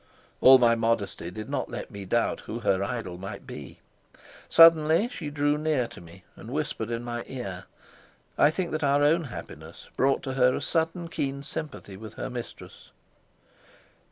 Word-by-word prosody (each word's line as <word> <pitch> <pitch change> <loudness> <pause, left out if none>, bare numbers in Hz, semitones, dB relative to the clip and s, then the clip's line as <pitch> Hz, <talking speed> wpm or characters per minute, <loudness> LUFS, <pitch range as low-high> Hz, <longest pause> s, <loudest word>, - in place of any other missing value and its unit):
All 130 +1 +9
my 120 -2 +4
modesty 115 -6 -1
did 110 +4 -7
not - - -3
let - - -6
me 100 -1 -8
doubt 115 +5 0
who 115 - -6
her 95 -3 +1
idol 100 -5 -4
might 100 +1 -7
be. - - -10 0.7
Suddenly 165 +4 +6
she 150 - -6
drew 145 0 +1
near 150 -5 +1
to 120 - -12
me 85 +2 -15
and 110 - -11
whispered 135 -5 -3
in 115 0 -3
my 120 -1 -4
ear. 95 -8 -6 0.7
I 145 - +5
think 170 +2 -3
that 155 0 -2
our 145 0 +3
own 160 +3 +3
happiness 130 - -10
brought 135 +1 +2
to 130 - -3
her 125 -1 +3
a - - -2
sudden 165 +1 -1
keen 140 -3 -3
sympathy 145 -10 -7
with 110 +1 -10
her - - -5
mistress. 120 -1 -9
130 Hz, 170 wpm, -27 LUFS, 110-150 Hz, 0.7 s, All